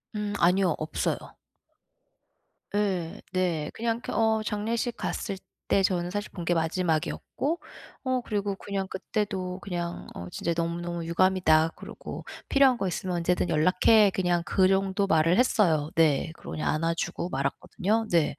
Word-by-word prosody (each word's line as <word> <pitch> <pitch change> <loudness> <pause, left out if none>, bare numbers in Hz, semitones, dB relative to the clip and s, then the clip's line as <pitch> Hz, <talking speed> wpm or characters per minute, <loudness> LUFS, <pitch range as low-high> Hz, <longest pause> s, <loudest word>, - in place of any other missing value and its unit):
음 210 -1 -2
아니요. 180 -1 +3
없어요. 155 - -1 1.6
예. 190 -5 -1
네. 175 -5 0
그냥 230 0 -1
이렇게 240 - -6
어 220 -1 +2
장례식 225 +3 -1
갔을 195 -3 -3 0.3
때 195 - +3
저는 175 -2 +1
사실 205 +3 -4
본 175 -3 -6
게 175 - +2
마지막이었고 170 - -1 0.4
어 255 -1 0
그리고 205 -3 -2
그냥 195 -1 -4
그때도 190 -1 -3
그냥 175 -3 -4
"어 85 0 -7
진짜 170 - -2
너무너무 170 0 -2
유감이다." 170 -2 +3
그러고 - - -8 0.2
"필요한 270 -3 +5
거 195 - -1
있으면 180 0 -2
언제든 175 +1 +1
연락해." 185 +6 +5
그냥 180 -2 +1
그 190 -1 +3
정도 195 +1 +2
말을 165 -1 +3
했어요. 170 - +3
네. 160 -1 +3
그러고 - - -10
그냥 155 - -2
안아 165 +2 +1
주고 170 - -3
말았거든요. 185 +10 -1
네. 165 -3 +2
185 Hz, 315 characters per minute, -27 LUFS, 170-205 Hz, 1.6 s, 필요한